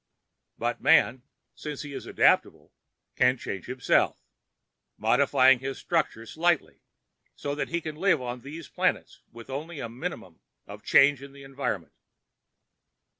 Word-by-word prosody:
"But - - -2
man, 125 +1 +4 0.3
since 150 -2 -6
he 145 -1 -8
is - - -7
adaptable, - - +2 0.4
can 125 +1 +3
change 100 -5 -6
himself—modify 130 +1 +1
his 135 +2 -5
structure 155 -9 -1
slightly—so 160 -2 -3
that 145 - -3
he 170 +1 -1
can 155 -1 -6
live 195 +4 +3
on 125 -1 -5
these 150 +4 -9
planets - - -1
with 115 +2 -11
only 155 +3 -5
a 115 - -5
minimum 120 - -7 0.2
of - - -10
change 140 -1 +5
in 140 0 -11
the 140 0 -13
environment." 130 - -4
135 Hz, 125 wpm, -27 LUFS, 125-150 Hz, 0.4 s, change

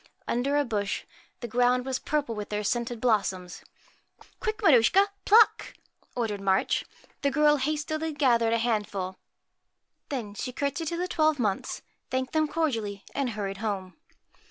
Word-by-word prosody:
Under 275 +4 +1
a 290 - +2
bush, 205 -4 -2 0.4
the 240 - -4
ground 245 +2 +2
was 265 -1 -1
purple 295 -6 -1
with 210 -1 -6
their 210 0 -2
scented 235 +2 -1
blossoms. 195 -6 0 0.6
1 - - -19 0.2
Quick, 435 -2 -2
Maruschka, 340 - +5 0.2
pluck! 445 +2 +5 0.2
' - - -36
ordered 215 -4 -1
March. 190 -1 +1 0.4
The 280 - +2
girl 295 +1 +4
hastily 310 +3 -2
gathered 240 -6 +3
a - - +3
handful. 205 -5 -2 0.9
Then 235 -7 -4
she 250 +4 -5
cour 280 +2 0
tesied 325 +3 -4
to 335 - -2
the 360 +1 -1
twelve 310 -3 +2
Months, 210 -6 -2 0.3
thanked 260 +1 -2
them 310 -1 +2
cordially, 230 -11 -2
and 275 -3 -1
hurried 200 -3 -4
home. 195 -3 -3
245 Hz, 155 wpm, -27 LUFS, 210-295 Hz, 0.9 s, Maruschka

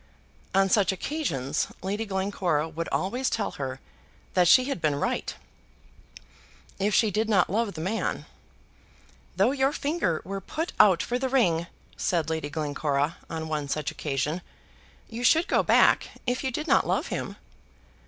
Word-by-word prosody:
On 195 0 +5
such 195 -1 +3
occasions 185 - -2 0.2
Lady 205 +4 -2
Glencora 190 -5 0
would 165 +1 -5
always 245 +8 0
tell 215 -3 -1
her 130 -1 -5 0.5
that 180 -1 +4
she 255 +8 +7
had 275 -10 -3
been 150 -2 +1
right, 140 - -2 1.4
if 200 +1 +1
she 220 -3 +3
did 220 +3 0
not 195 -5 +3
love 220 0 0
the 160 - -5
man. 195 +7 -2 1.1
"Though 200 +7 +3
your 270 0 +2
finger 290 - -1
were 195 +1 -4
put 320 - -4
out 185 -4 +6
for 245 +4 -2
the 260 0 -1
ring," 175 -11 +2 0.3
said 165 -3 0
Lady 160 -2 -2
Glencora 145 0 -1
on 160 -1 -4
one 150 -2 -2
such 150 0 -2
occasion, 150 +4 -2 0.7
"you 230 +2 -6
should 325 +6 +4
go - - +3
back, - - +4 0.2
if 250 +1 -1
you 265 - 0
did 300 +5 -3
not - - +3
love - - 0
him." - - -4
190 Hz, 155 wpm, -27 LUFS, 160-235 Hz, 1.4 s, she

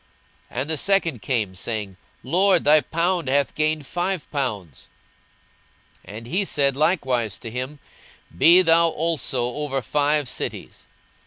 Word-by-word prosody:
42:019:018 125 - -3
And 145 - -5
the 160 - 0
second 170 - +1
came, 110 -7 -1
saying, 100 -1 -5 0.3
Lord, 185 +5 +2
thy 150 +1 +5
pound 170 0 -1
hath 140 +1 +1
gained 155 -1 -1
five 180 +2 -3
pounds. 105 - -4 1.2
42:019:019 - - -9
And 115 - -9
he 180 - -1
said 140 -7 +1
likewise 130 - 0
to 115 - -9
him, 130 +5 -5 0.6
Be 170 - +6
thou 165 0 +4
also 150 -7 -1
over 140 -3 -3
five 145 +2 +1
cities. - - -6
145 Hz, 140 wpm, -22 LUFS, 125-165 Hz, 1.2 s, Be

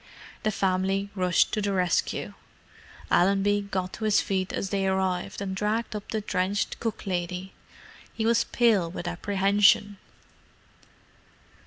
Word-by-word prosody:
The 215 - 0
family 195 0 0
rushed 180 -3 +2
to 215 - 0
the 200 -1 -1
rescue. 180 -2 0 0.8
Allenby 200 +2 +3
got 185 -1 -2
to 220 - -4
his 215 -1 +4
feet 190 -1 -1
as 195 - -3
they 195 -1 0
arrived, 190 -1 -1
and 190 -1 -3
dragged 215 +3 -1
up 205 - -7
the 220 - -2
drenched 195 0 -1
cook 225 -2 -4
lady. 180 0 -3 0.6
He 220 - -3
was 230 0 +3
pale 215 -8 +2
with 175 0 -6
apprehension. 200 +2 +2
195 Hz, 135 wpm, -26 LUFS, 185-205 Hz, 0.8 s, his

